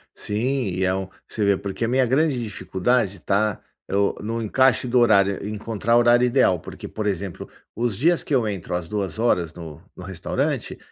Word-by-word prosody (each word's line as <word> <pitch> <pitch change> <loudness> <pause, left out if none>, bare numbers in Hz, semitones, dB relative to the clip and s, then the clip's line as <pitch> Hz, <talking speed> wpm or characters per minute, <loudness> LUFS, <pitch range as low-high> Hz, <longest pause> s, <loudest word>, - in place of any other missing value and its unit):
Sim, 125 +4 -1
e 90 0 -2
é 95 0 +2
um 95 0 -3 0.2
você 110 - -2
vê, 100 -1 +3
porque 100 +4 -3
a - - -1
minha 130 +2 +2
grande 135 +1 +1
dificuldade 105 0 -1
está 100 +4 0 0.3
eu 100 +1 +1
no 115 +2 -3
encaixe 125 +3 +2
do 125 +1 +3
horário, 100 -5 +3
encontrar 110 +2 0
horário 120 +1 +5
ideal, 125 -7 +3
porque, - - -9
por 110 - -5
exemplo, 100 -3 -3 0.3
os 115 -3 -1
dias 170 - +3
que - - -4
eu 120 -5 +2
entro 100 -5 -4
às 90 -2 -3
14:00 100 -4 0
no 80 -2 -10
no 90 - -10
restaurante, 90 -2 -3
105 Hz, 180 wpm, -23 LUFS, 95-120 Hz, 0.3 s, horário